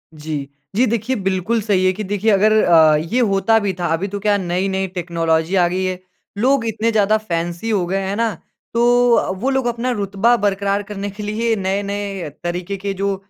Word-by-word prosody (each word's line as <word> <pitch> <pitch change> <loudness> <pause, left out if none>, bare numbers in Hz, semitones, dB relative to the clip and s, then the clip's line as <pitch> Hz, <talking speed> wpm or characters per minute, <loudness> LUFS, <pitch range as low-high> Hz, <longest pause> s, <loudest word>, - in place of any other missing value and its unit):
जी। 150 -2 -5 0.3
जी, 245 +5 +4
देखिए 235 +2 -1
बिल्कुल 195 +3 -1
सही 200 -3 +1
है 185 - +4
कि 210 +3 -5
देखिए 205 +2 0
अगर 205 +2 +4
अ, 160 -3 +6
ये 165 +11 -1
होता 225 0 +3
भी 200 -3 -1
था, 175 - 0
अभी 175 +5 -1
तो 205 +1 -5
क्या 205 0 +2
नई-नई 190 +1 -1
टेक्नोलॉजी 165 0 0
आ 180 -2 +4
गयी 185 +2 -1
है, 185 -1 -2 0.4
लोग 255 +2 +2
इतने 225 +1 0
ज़्यादा 215 0 +3
फैंसी 175 0 -3
हो 200 -5 +1
गए 190 +2 -1
हैं 190 0 -3
है 200 - -2
ना, 225 0 0 0.4
तो 245 +1 +4
अ, - - +1
वो 190 +8 -2
लोग 265 -2 0
अपना 240 +1 -1
रुतबा 205 +1 +1
बरकरार 200 -1 0
करने 205 0 -5
के 205 +2 -8
लिए 225 +2 0
नए-नए 200 -2 -3
तरीक़े 175 +3 -3
के 200 +1 -3
जो 195 +1 -1
200 Hz, 205 wpm, -19 LUFS, 185-220 Hz, 0.4 s, अ